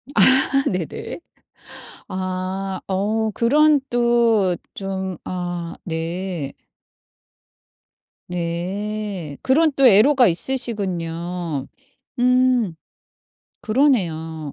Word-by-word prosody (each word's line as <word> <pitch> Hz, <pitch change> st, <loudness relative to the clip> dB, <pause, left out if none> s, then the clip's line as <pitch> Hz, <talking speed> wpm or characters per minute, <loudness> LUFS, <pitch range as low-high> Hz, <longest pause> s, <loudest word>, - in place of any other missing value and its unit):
아 -, -, +5 dB, 0.5 s
네네. 180 Hz, -, -5 dB, 0.9 s
아 185 Hz, +1 st, -4 dB
어 215 Hz, +3 st, 0 dB
그런 295 Hz, +5 st, +4 dB
또 235 Hz, -6 st, +2 dB, 0.2 s
좀 190 Hz, -2 st, -4 dB
아 175 Hz, -2 st, -4 dB
네. 165 Hz, -1 st, -4 dB, 1.8 s
네. 180 Hz, 0 st, -4 dB
그런 305 Hz, +4 st, +3 dB
또 270 Hz, -2 st, +6 dB
애로가 245 Hz, +4 st, +6 dB
있으시군요. 175 Hz, -, -1 dB, 0.5 s
음. 250 Hz, -6 st, +3 dB, 0.9 s
그러네요. 165 Hz, -, 0 dB
190 Hz, 115 characters per minute, -21 LUFS, 175-235 Hz, 1.8 s, 또